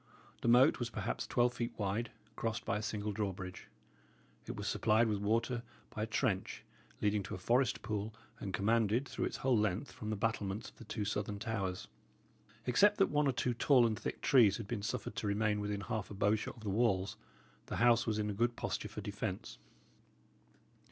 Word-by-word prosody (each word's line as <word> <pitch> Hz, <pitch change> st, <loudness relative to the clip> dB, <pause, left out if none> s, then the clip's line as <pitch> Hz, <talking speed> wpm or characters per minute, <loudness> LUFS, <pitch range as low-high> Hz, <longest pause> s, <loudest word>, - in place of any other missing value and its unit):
The -, -, -1 dB
moat 125 Hz, +5 st, +6 dB
was 120 Hz, -1 st, -2 dB
perhaps 105 Hz, -2 st, -3 dB
twelve 120 Hz, 0 st, +2 dB
feet 120 Hz, -1 st, -4 dB
wide, 105 Hz, +3 st, -1 dB, 0.3 s
crossed 115 Hz, -1 st, -2 dB
by 100 Hz, -, 0 dB
a -, -, -3 dB
single 105 Hz, -1 st, -2 dB
drawbridge. 95 Hz, -3 st, -4 dB, 0.8 s
It -, -, -4 dB
was -, -, -4 dB
supplied 110 Hz, +1 st, +3 dB
with 105 Hz, -2 st, 0 dB
water 115 Hz, +4 st, +1 dB, 0.3 s
by 105 Hz, -, -5 dB
a -, -, +1 dB
trench, 110 Hz, -4 st, -1 dB, 0.4 s
leading 105 Hz, 0 st, +2 dB
to 95 Hz, -, -5 dB
a -, -, -6 dB
forest 120 Hz, +6 st, +1 dB
pool 105 Hz, -1 st, -2 dB, 0.3 s
and 100 Hz, -, -4 dB
commanded, 110 Hz, +6 st, +2 dB
through -, -, -2 dB
its -, -, -3 dB
whole 130 Hz, -2 st, +2 dB
length, 105 Hz, +4 st, 0 dB
from 110 Hz, -5 st, -6 dB
the 110 Hz, -, 0 dB
battlements 105 Hz, -1 st, -2 dB
of -, -, -30 dB
the 115 Hz, -, -11 dB
two 105 Hz, 0 st, -3 dB
southern 105 Hz, 0 st, -2 dB
towers. 100 Hz, -4 st, -3 dB, 0.8 s
Except 205 Hz, -, +5 dB
that 195 Hz, -, +3 dB
one 150 Hz, 0 st, +3 dB
or -, -, +4 dB
two 125 Hz, +1 st, 0 dB
tall 125 Hz, +1 st, +5 dB
and 110 Hz, -2 st, 0 dB
thick -, -, -4 dB
trees 115 Hz, -8 st, +5 dB
had 115 Hz, -4 st, -6 dB
been 110 Hz, -2 st, -3 dB
suffered 100 Hz, +1 st, -3 dB
to 105 Hz, -, -1 dB
remain 105 Hz, +1 st, +1 dB
within 105 Hz, -1 st, -2 dB
half 110 Hz, -1 st, -3 dB
a 105 Hz, -, -7 dB
bowshot 105 Hz, +2 st, +1 dB
of 110 Hz, -, -13 dB
the 105 Hz, -, -2 dB
walls, 100 Hz, -3 st, +1 dB, 0.5 s
the -, -, -3 dB
house 115 Hz, 0 st, +4 dB
was 110 Hz, -1 st, +1 dB
in 105 Hz, -1 st, 0 dB
a -, -, -3 dB
good 120 Hz, +3 st, +1 dB
posture -, -, -3 dB
for -, -, -6 dB
defence. -, -, -4 dB
110 Hz, 200 wpm, -34 LUFS, 100-120 Hz, 0.8 s, moat